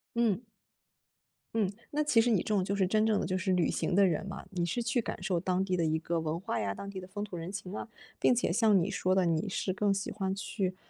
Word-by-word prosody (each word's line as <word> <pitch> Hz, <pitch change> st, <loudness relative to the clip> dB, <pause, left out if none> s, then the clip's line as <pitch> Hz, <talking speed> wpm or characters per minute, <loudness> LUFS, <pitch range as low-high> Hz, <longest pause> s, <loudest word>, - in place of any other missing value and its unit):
嗯。 230 Hz, -4 st, +2 dB, 1.1 s
嗯， 210 Hz, -4 st, +1 dB, 0.2 s
那 300 Hz, +1 st, +1 dB
其 295 Hz, -6 st, +4 dB
实 240 Hz, -, +2 dB
你 220 Hz, -, +4 dB
这 -, -, -12 dB
种 205 Hz, -3 st, +2 dB
就 195 Hz, +2 st, -1 dB
是 195 Hz, -1 st, +3 dB
真 215 Hz, +3 st, +2 dB
正 215 Hz, -2 st, +3 dB
的 -, -, -1 dB
就 185 Hz, 0 st, 0 dB
是 185 Hz, +1 st, 0 dB
旅 180 Hz, -2 st, +2 dB
行 175 Hz, -, -1 dB
的 200 Hz, 0 st, +6 dB
人 175 Hz, +1 st, 0 dB
嘛， 195 Hz, -, -7 dB
你 175 Hz, -3 st, -1 dB
是 205 Hz, +8 st, -1 dB
去 245 Hz, +1 st, +1 dB
感 -, -, -5 dB
受 180 Hz, -3 st, +1 dB
当 185 Hz, +1 st, 0 dB
地 185 Hz, -1 st, 0 dB
的 170 Hz, -, +1 dB
一 160 Hz, 0 st, +2 dB
个 170 Hz, +1 st, -1 dB
文 160 Hz, +1 st, -2 dB
化 220 Hz, +5 st, -2 dB
呀， 100 Hz, -1 st, -1 dB
当 200 Hz, -, -7 dB
地 190 Hz, -1 st, -6 dB
的 185 Hz, -, -9 dB
风 205 Hz, +2 st, -5 dB
土 190 Hz, -4 st, -6 dB
人 170 Hz, +2 st, -5 dB
情 200 Hz, -1 st, -6 dB
啊。 -, -, -5 dB, 0.3 s
并 250 Hz, -, +4 dB
且 240 Hz, -, +1 dB
像 210 Hz, +1 st, +4 dB
你 185 Hz, -, -1 dB
说 185 Hz, +1 st, +1 dB
的， 190 Hz, -1 st, +3 dB
你 165 Hz, +4 st, +1 dB
是 190 Hz, -, -1 dB
更 200 Hz, 0 st, +2 dB
喜 195 Hz, +1 st, -3 dB
欢 190 Hz, -2 st, -2 dB
去， 195 Hz, -2 st, -2 dB
195 Hz, 290 characters per minute, -31 LUFS, 180-210 Hz, 1.1 s, 的